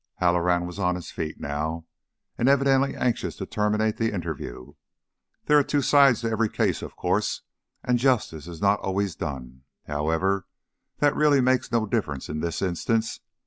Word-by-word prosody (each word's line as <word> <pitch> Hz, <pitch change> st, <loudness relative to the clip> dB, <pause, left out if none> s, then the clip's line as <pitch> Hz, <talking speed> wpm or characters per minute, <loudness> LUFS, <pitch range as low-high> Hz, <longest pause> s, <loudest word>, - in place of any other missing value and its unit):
Halloran 90 Hz, 0 st, +2 dB
was 90 Hz, +2 st, -7 dB
on 90 Hz, -2 st, +1 dB
his 90 Hz, -, -7 dB
feet 80 Hz, -1 st, -5 dB
now, 80 Hz, +3 st, -3 dB, 0.5 s
and 120 Hz, -, +2 dB
evidently 135 Hz, 0 st, +3 dB
anxious 120 Hz, -1 st, -1 dB
to -, -, -5 dB
terminate 105 Hz, 0 st, 0 dB
the 115 Hz, 0 st, 0 dB
interview. 80 Hz, -9 st, -6 dB, 0.7 s
"There 150 Hz, 0 st, +5 dB
are -, -, +3 dB
two 145 Hz, 0 st, 0 dB
sides 140 Hz, -5 st, +5 dB
to 115 Hz, -1 st, -1 dB
every 110 Hz, 0 st, +1 dB
case, -, -, 0 dB
of -, -, -8 dB
course, 95 Hz, +4 st, -1 dB, 0.4 s
and 125 Hz, -1 st, +1 dB
justice 110 Hz, -, 0 dB
is 85 Hz, -2 st, -8 dB
not 100 Hz, +1 st, +3 dB
always 95 Hz, -1 st, -1 dB
done. 65 Hz, -4 st, -6 dB, 0.2 s
However, 80 Hz, +6 st, 0 dB, 0.5 s
that 145 Hz, -1 st, +2 dB
really 150 Hz, -2 st, +4 dB
makes 130 Hz, -1 st, +2 dB
no 115 Hz, -2 st, +2 dB
difference 100 Hz, -, -2 dB
in 75 Hz, +1 st, -3 dB
this 85 Hz, +2 st, -2 dB
instance. 110 Hz, +5 st, -1 dB
100 Hz, 165 wpm, -25 LUFS, 85-120 Hz, 0.7 s, There